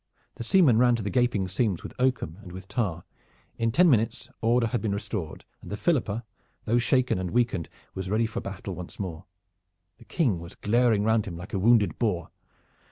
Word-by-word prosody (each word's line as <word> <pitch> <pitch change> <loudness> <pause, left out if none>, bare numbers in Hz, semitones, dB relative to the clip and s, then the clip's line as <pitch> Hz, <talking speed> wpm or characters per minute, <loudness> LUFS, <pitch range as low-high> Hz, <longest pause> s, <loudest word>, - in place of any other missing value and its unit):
The - - -7
seamen 135 - +5
ran 120 -1 +5
to 115 - -3
the 100 - -2
gaping 120 -7 +1
seams 95 -1 -1
with - - -8
oakum 125 -9 0
and 90 - -11
with 95 +1 -9
tar. 100 -6 -2 0.6
In 115 0 +1
ten 175 +9 +5
minutes 115 -4 +1
order 115 +1 +3
had 115 -1 -1
been 105 -3 -1
restored 100 -6 -5 0.2
and - - -10
the 105 - -3
Philippa, 115 - 0 0.4
though 115 +2 +2
shaken 125 -3 +2
and 90 -1 -3
weakened, 115 -6 0 0.2
was 95 -1 -5
ready 110 +3 +2
for 110 - -4
battle 95 0 -6
once 90 0 -9
more. 90 -2 -5 0.7
The 115 - -16
King 120 - 0
was 85 +1 -10
glaring 115 -1 +2
round 110 0 +2
him 85 -3 -6
like 90 +3 -9
a 95 - 0
wounded 110 0 +3
boar. 90 -8 -1
110 Hz, 195 wpm, -27 LUFS, 95-120 Hz, 0.7 s, seamen